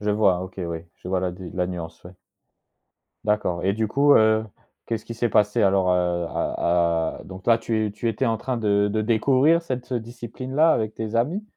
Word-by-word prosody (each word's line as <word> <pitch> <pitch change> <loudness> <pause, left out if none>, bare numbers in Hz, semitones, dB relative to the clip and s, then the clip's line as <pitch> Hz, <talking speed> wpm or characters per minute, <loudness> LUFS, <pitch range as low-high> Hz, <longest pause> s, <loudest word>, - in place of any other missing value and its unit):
Je 105 0 -1
vois, 100 -4 +3
OK 95 0 -8
oui, 85 -2 -4 0.2
je - - -13
vois 90 0 0
la 90 - -1
di 90 0 -9
la 90 -1 -1
nuance 85 -2 -7
ouais. 90 +1 -12 1.1
D'accord 105 -5 0
et 95 - +2
du 110 +2 -1
coup, 140 +6 +4
heu, 110 0 +4 0.4
qu'est-ce 110 -1 -3
qui 115 - -7
s'est 120 +1 0
passé 105 +2 +2
alors, 95 -2 +3
heu, 90 -1 0
à 85 -1 0
à - - -13
donc 95 0 -11
là, 115 -1 +6
tu 110 -3 -2
tu 115 +2 -2
étais 115 +4 -1
en 115 - +1
train 125 +3 -3
de 105 -2 +2
de 110 - 0
découvrir 130 +9 +3
cette 130 -4 -5
discipline-là 125 +6 0
avec 110 -1 -1
tes 110 0 -5
amis? 150 - 0
105 Hz, 200 wpm, -24 LUFS, 90-120 Hz, 1.1 s, là